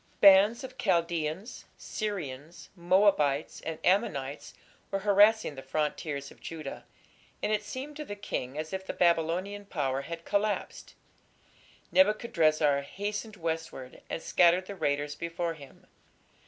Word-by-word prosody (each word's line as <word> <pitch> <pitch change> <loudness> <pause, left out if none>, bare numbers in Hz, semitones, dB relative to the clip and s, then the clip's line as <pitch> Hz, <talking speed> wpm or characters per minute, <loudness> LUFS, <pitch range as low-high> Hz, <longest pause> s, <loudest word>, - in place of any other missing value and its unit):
" - - -36
Bands 200 +5 +7
of 260 0 -9
Chaldaeans, 170 +3 -1
Syrians, 170 - -5
Moabites, 175 -5 +2
and 160 -1 -4
Ammonites 145 - 0 0.3
were 195 - -1
harassing 205 -2 +5
the 135 - -8
frontiers 145 0 -3
of - - -17
Judah, 155 -4 -7 0.6
and - - +1
it 215 -1 +2
seemed 265 +7 -7
to 305 - -4
the 205 - -6
king 145 -9 -4
as 155 +2 -4
if 190 0 -3
the - - -5
Babylonian 175 +4 +1
power 135 -6 -1
had 165 +3 -7
collapsed. 205 0 -2 1.0
Nebuchadrezzar 155 - +3
hastened 205 +8 -5
westward 160 -7 -5
and 165 - -4
scattered 175 +1 +4
the 200 - -7
raiders 145 -3 -1
before 170 +2 -3
him. 140 -4 -14
170 Hz, 130 wpm, -29 LUFS, 150-205 Hz, 1.0 s, Bands